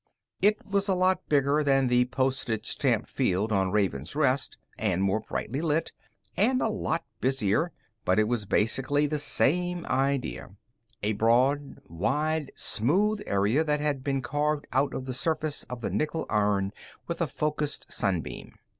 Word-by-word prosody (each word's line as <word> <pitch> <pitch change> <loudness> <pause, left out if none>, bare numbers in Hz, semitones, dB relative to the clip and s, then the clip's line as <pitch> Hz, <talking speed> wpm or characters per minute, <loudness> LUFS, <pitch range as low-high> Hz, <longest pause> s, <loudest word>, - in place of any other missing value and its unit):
It 210 +2 +3
was 200 0 0
a 190 - +2
lot 185 +1 +1
bigger 145 +1 +3
than 135 -2 +3
the 125 0 +3
postage 130 -3 -1
stamp - - 0
field 100 +5 0
on 95 -2 +2
Raven's 90 - -1
Rest, 140 -3 +1 0.2
and 95 -4 +1
more 100 +2 +2
brightly 130 +5 -4
lit, 160 0 0 0.4
and 255 +6 +3
a 225 - +1
lot 180 -6 -2
busier, 130 - +1 0.3
but 90 - +2
it 110 - +5
was 115 -3 -1
basically 135 +9 +2
the 150 +1 -1
same 175 +4 +2
idea 135 -6 -1 0.5
a 105 +1 +1
broad, 125 +7 +2
wide, 150 - -1
smooth 200 - +1
area 105 +10 +2
that 150 -1 0
had 145 -3 -1
been 135 -2 -1
carved 150 +1 -1
out 135 +2 +1
of 130 - -4
the 130 - -4
surface 155 +2 -2
of 125 -1 -7
the - - -2
nickel 155 +1 -1
iron 100 -2 +1 0.3
with - - -4
a - - +2
focused 150 -1 -3
sun 90 -4 0
beam. - - -9
135 Hz, 160 wpm, -27 LUFS, 110-155 Hz, 0.5 s, it